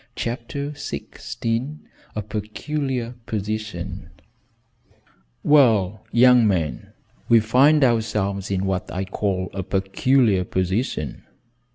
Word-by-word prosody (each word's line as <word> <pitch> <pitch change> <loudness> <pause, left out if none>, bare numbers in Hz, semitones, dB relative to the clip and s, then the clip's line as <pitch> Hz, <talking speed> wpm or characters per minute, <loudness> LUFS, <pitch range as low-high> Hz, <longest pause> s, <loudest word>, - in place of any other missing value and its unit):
CHAPTER 125 +5 -4
XVI 140 -2 -4 0.4
A 105 - -2
PECULIAR 120 +4 -3
POSITION 100 -4 -4 1.3
"Well, 110 -9 +4
young 125 -1 +6
man, 85 -7 -1 0.4
we 115 - +7
find 135 +7 +4
ourselves 105 -5 0
in 95 -1 -1
what 95 -1 -2
I 95 +2 -3
call 95 -2 -2
a 95 - -3
peculiar 95 +3 +2
position." 95 - -2
110 Hz, 90 wpm, -23 LUFS, 95-125 Hz, 1.3 s, we